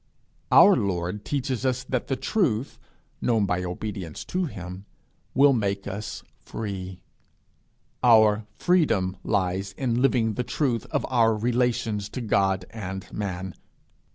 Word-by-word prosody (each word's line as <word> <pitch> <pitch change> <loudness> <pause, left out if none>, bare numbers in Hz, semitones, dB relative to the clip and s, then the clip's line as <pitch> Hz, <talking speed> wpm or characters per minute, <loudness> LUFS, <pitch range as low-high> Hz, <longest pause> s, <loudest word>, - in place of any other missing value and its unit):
Our 200 - +8
Lord 95 -1 -2
teaches 130 -3 -2
us 130 -1 0
that 130 -1 -2
the 135 - 0
truth, 130 - -1 0.4
known 115 -4 +2
by 90 -1 -1
obedience 90 -2 -5
to 185 0 -1
him, 90 - -7 0.5
will 140 +1 +6
make 100 -4 -1
us 100 +2 -5 0.2
free: 95 -4 -6 1.0
our 110 -3 +5
freedom 115 - +2
lies 95 +1 -1
in 120 +1 -1
living 115 -5 +2
the 125 - -2
truth 125 -4 -1
of - - -1
our 115 -3 +3
relations 115 -2 0
to 125 - -5
God 95 -4 +1
and 95 -3 -7
man. 95 -2 -4
110 Hz, 125 wpm, -25 LUFS, 95-125 Hz, 1.0 s, Our